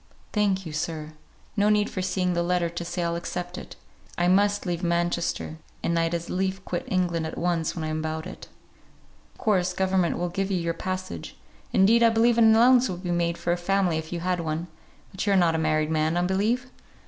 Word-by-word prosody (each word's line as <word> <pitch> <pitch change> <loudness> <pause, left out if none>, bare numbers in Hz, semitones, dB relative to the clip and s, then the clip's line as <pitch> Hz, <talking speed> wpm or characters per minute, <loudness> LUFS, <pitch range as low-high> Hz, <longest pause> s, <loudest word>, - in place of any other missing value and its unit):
"Thank 195 -3 +1
you, 160 - -6
sir. 155 0 -4 0.4
No 205 0 +3
need 210 -1 +3
for 185 - -4
seeing 185 -1 0
the 170 - +1
letter 175 0 +1
to 170 0 -5
say 175 +1 -3
I'll 170 0 -1
accept 175 +1 -5
it. - - -9 0.4
I 175 - +2
must 205 +3 +3
leave 175 -1 -2
Manchester; 170 -2 -1 0.2
and 170 0 +1
I'd 165 +1 0
as 170 0 -4
lief 190 +1 -2
quit 175 - -3
England 170 -3 0
at - - -7
once 170 -2 0
when 165 - -4
I'm 155 0 -2
about 160 0 -3
it." - - -9 0.9
"Of - - -26
course 185 -4 +1
government 185 -2 +1
will 175 0 -1
give 195 +3 -2
you 190 - +1
your 170 -1 -1
passage; 185 - -5 0.3
indeed, 220 +5 +5
I 230 - +7
believe 230 +1 +3
an 220 -1 +7
allowance 250 +2 +5
would 180 0 -5
be 175 - -2
made 170 -1 0
for 175 - 0
a - - -1
family 180 -2 +1
if 160 0 -8
you 170 -1 -3
had 180 0 0
one; 165 +1 -3 0.4
but 190 - -4
you 200 - +4
are - - +4
not 170 -3 +4
a 160 - 0
married 155 0 +1
man, 160 +1 +1
I 175 - +2
believe?" 210 +8 +1
175 Hz, 220 wpm, -26 LUFS, 170-190 Hz, 0.9 s, I